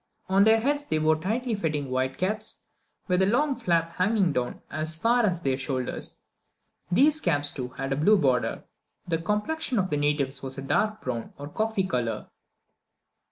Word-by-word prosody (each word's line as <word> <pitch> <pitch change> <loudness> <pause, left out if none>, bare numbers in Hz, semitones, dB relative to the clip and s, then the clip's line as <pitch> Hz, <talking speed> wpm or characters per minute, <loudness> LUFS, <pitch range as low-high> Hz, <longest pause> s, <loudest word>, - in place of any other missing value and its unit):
On 195 +1 +5
their 220 +1 +6
heads 290 +4 0
they 155 - 0
wore 155 0 +3
tightly 225 +9 -2
fitting 155 -9 -2
white 130 +1 -1
caps, 215 +4 -2 0.4
with 180 -1 +2
a 190 - +5
long 275 +6 +2
flap 165 -4 0
hanging 190 -3 +2
down 125 -2 -2
as 155 +1 -1
far 235 +7 +3
as 180 -5 +1
their 135 -4 0
shoulders. 130 -2 -3 0.7
These 295 +10 +4
caps, 145 -4 +2
too, 130 -3 -4
had 135 +2 -4
a - - -2
blue 205 +8 +5
border. 130 -7 +1 0.4
The 165 -2 0
complexion 220 - -1
of 190 -2 0
the 150 - +1
natives 145 -2 0
was 135 0 -5
a 135 - -5
dark 215 +9 0
brown 120 -3 -4
or 145 +1 -7
coffee 215 +2 -1
colour. 120 -9 -2
170 Hz, 175 wpm, -26 LUFS, 140-215 Hz, 0.7 s, their